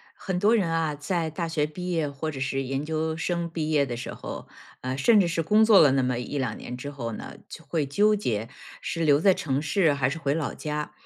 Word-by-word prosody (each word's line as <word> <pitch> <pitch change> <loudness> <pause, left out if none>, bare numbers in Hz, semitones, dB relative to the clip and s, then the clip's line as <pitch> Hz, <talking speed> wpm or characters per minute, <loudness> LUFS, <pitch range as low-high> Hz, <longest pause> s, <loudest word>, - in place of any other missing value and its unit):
很 185 -2 -3
多 210 +5 +4
人 190 -7 +2
啊， 165 -2 0
在 160 +3 -2
大 165 +2 -3
学 155 -2 0
毕 180 +4 -6
业 165 -4 0
或 140 +3 -4
者 140 -3 -7
是 135 0 -1
研 135 +2 -3
究 160 0 -2
生 170 +1 -2
毕 160 -2 -3
业 145 -2 +3
的 120 -2 -4
时 120 - -6
候， - - -8 0.3
呃， 130 +1 -3
甚 210 +9 +5
至 180 - +2
是 165 0 0
工 210 +7 +4
作 215 -3 +7
了 145 -4 +6
那 135 -1 +2
么 125 -1 0
1-2 125 -2 -3
年 125 - -7
之 140 +3 -6
后 120 -5 -5
呢， - - -7
就 - - -10
会 155 -4 -1
纠 205 +10 +3
结， 115 - -2 0.3
是 165 -1 -2
留 145 -2 +4
在 190 +2 +5
城 140 -5 -1
市 160 +1 +2
还 140 -2 +1
是 160 - -4
回 140 -3 0
老 155 -2 -2
家？ 150 0 -4
155 Hz, 255 characters per minute, -26 LUFS, 140-170 Hz, 0.3 s, 作